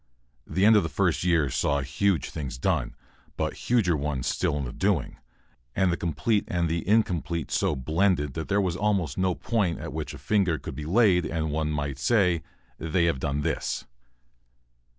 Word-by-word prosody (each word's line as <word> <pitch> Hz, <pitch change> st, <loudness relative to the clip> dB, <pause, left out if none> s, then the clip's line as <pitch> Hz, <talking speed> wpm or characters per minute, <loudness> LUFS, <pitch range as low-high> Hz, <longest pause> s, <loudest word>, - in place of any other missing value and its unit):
The 95 Hz, +2 st, +1 dB
end 110 Hz, +1 st, +7 dB
of 105 Hz, -, +6 dB
the 80 Hz, -, -3 dB
first 90 Hz, -3 st, 0 dB
year 80 Hz, -6 st, +2 dB
saw 70 Hz, +1 st, +1 dB
huge 80 Hz, +4 st, 0 dB
things 70 Hz, -6 st, -5 dB
done, -, -, -1 dB, 0.4 s
but -, -, -1 dB, 0.2 s
huger 110 Hz, -9 st, +3 dB
ones 70 Hz, -4 st, -2 dB
still 75 Hz, -, 0 dB
in 70 Hz, -, -2 dB
the -, -, -6 dB
doing, 95 Hz, -5 st, 0 dB, 0.6 s
and 95 Hz, -2 st, +2 dB
the -, -, +1 dB
complete 85 Hz, +7 st, 0 dB
and 85 Hz, -1 st, 0 dB
the 85 Hz, +1 st, 0 dB
incomplete 90 Hz, -6 st, +1 dB
so -, -, +1 dB
blended 80 Hz, +1 st, +1 dB
that 80 Hz, -, -4 dB
there 100 Hz, 0 st, +2 dB
was 90 Hz, -4 st, 0 dB
almost 95 Hz, -7 st, 0 dB
no 95 Hz, -1 st, +1 dB
point 105 Hz, -8 st, 0 dB
at -, -, -6 dB
which 75 Hz, -1 st, -4 dB
a -, -, -9 dB
finger 85 Hz, +3 st, +1 dB
could -, -, -7 dB
be 75 Hz, +3 st, -6 dB
laid 95 Hz, 0 st, +4 dB
and 80 Hz, -2 st, -2 dB
one 75 Hz, 0 st, -1 dB
might 70 Hz, -3 st, -3 dB
say: 90 Hz, -3 st, +2 dB, 0.4 s
"They 80 Hz, +2 st, +1 dB
have 85 Hz, -6 st, +1 dB
done 70 Hz, +2 st, -1 dB
this." -, -, -2 dB
85 Hz, 185 wpm, -26 LUFS, 75-95 Hz, 0.6 s, end